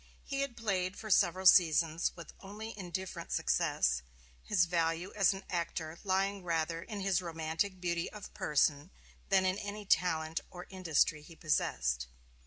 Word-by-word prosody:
He 275 -1 -4
had 275 -4 -3
played 195 -4 -1
for 215 - -6
several 185 +1 +3
seasons 165 -2 +5
with 170 -3 -10
only 210 +3 -8
indifferent 185 -1 -5
success, 60 0 +1 0.4
his 185 -4 +2
value 170 +1 -1
as 200 -2 +4
an 195 0 -6
actor 170 -2 -3
lying 195 0 0
rather 165 -1 -1
in 205 +2 -6
his 195 -1 +1
romantic 165 +3 -2
beauty 170 -1 -2
of 210 -2 -10
person 145 +2 +1 0.4
than 190 -1 +4
in 185 +2 +1
any 205 0 -6
talent 160 -4 +1
or 180 0 -9
industry 165 -5 +1
he 165 +2 -14
possessed. 60 - 0
180 Hz, 150 wpm, -33 LUFS, 165-195 Hz, 0.4 s, seasons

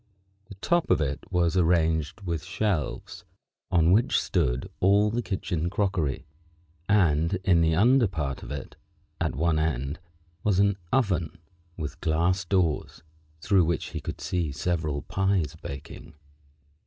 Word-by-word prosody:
The 100 - -11
top 170 - 0
of - - +4
it 70 -2 -1
was 85 -1 +1
arranged 80 -1 +1
with 85 -4 -3
shelves, 95 -5 -2 0.5
on 85 -1 +3
which 110 +5 +3
stood 60 +1 0
all 100 +3 +4
the 120 +2 -1
kitchen 85 -6 -2
crockery, 90 -9 -1 0.6
and 85 -4 +3
in 85 -3 +4
the 80 -1 +3
under 120 +5 +4
part 75 -8 -4
of - - -9
it, 70 -1 -6 0.4
at - - -1
one 80 +2 +1
end, 70 -2 -2 0.4
was 105 -3 +2
an 100 0 +3 0.2
oven 95 - 0 0.4
with 75 -3 -6
glass 85 +4 +1
doors, 90 -6 0 0.4
through 95 0 +3
which 85 0 -1
he - - -5
could - - -6
see 85 -5 -2
several 75 -1 -2
pies 95 -5 0
baking. 70 +1 -9
85 Hz, 140 wpm, -26 LUFS, 80-100 Hz, 0.6 s, of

